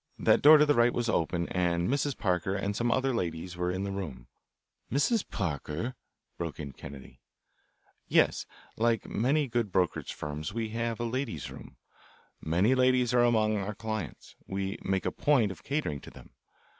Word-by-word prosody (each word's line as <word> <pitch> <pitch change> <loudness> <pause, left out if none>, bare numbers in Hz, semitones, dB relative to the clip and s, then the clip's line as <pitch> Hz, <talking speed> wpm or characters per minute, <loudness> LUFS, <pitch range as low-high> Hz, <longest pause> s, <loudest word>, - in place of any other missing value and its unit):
That - - +4
door 155 +2 +9
to 150 - +5
the 145 - +4
right 120 -2 +3
was 120 -1 0
open, 85 -3 0
and 85 -1 +1
Mrs. 140 +1 0
Parker 95 0 0
and 100 +1 -2
some 120 +2 +1
other 130 +1 +1
ladies 90 -4 -3
were 90 0 -1
in 95 +2 -2
the 100 - -3
room 75 -11 -5 0.3
" - - -44
"Mrs. 185 - +2
Parker?" 85 - -3 0.5
broke 85 -3 -4
in 70 -2 -5
Kennedy. 70 -1 -11 0.9
"Yes: - - +3 0.3
Like 115 0 +1
a - - -10
good - - -7
many 140 +5 +2
brokerage 100 -7 0
firms 75 +6 -5
we 115 -1 -2
have 115 +1 -2
a - - -1
ladies' 115 - -3
room. 65 - -12 0.6
Many 90 +10 +2
ladies 125 -1 +3
are 120 - +5
among 110 -3 +3
our 100 +1 -3
clients. 110 -6 -5
We 95 0 -3
make 95 -1 0
a - - +1
point 125 -9 +2
of - - -10
catering 140 - -2
to - - -11
them. - - -15
105 Hz, 180 wpm, -29 LUFS, 85-120 Hz, 0.9 s, door